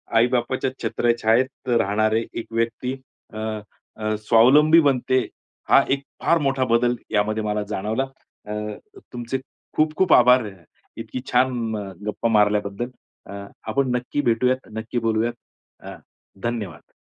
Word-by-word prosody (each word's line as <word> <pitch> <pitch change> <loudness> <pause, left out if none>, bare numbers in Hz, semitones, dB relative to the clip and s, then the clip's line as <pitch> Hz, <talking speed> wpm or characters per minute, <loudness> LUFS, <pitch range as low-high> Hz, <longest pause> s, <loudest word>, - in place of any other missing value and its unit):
आई-बापाच्या 125 +2 +2
छत्रछायेत 120 +3 +1
राहणारे 110 0 +2
एक 115 - -5
व्यक्ती 115 +3 -1 0.4
अ, - - -8 0.6
अ, 110 0 -1
स्वावलंबी 145 +8 +6
बनते. 130 -4 +1 0.4
हा - - +7
एक 140 0 0 0.2
फार 170 - +4
मोठा 135 -1 +1
बदल 120 +1 +2 0.2
यामध्ये 110 0 0
मला 105 0 -1
जाणवला. 110 +5 -1 0.4
अ, 105 - -4 0.6
तुमचे 120 +2 -3 0.4
खूप 155 0 +2
खूप 190 -4 +4
आभार, 125 -1 +6 0.5
इतकी 115 +2 -6
छान 125 -3 +1 0.3
गप्पा 105 +2 -1
मारल्याबद्दल, 105 +1 +1 0.4
अ, 100 0 -7 0.2
आपण 135 -1 +1
नक्की 125 +4 -2
भेटूयात, 125 +1 +1
नक्की 110 +2 -3
बोलूयात. 115 +1 0 0.5
अ, - - -9 0.5
धन्यवाद. 110 -9 -4
120 Hz, 120 wpm, -23 LUFS, 110-130 Hz, 0.6 s, हा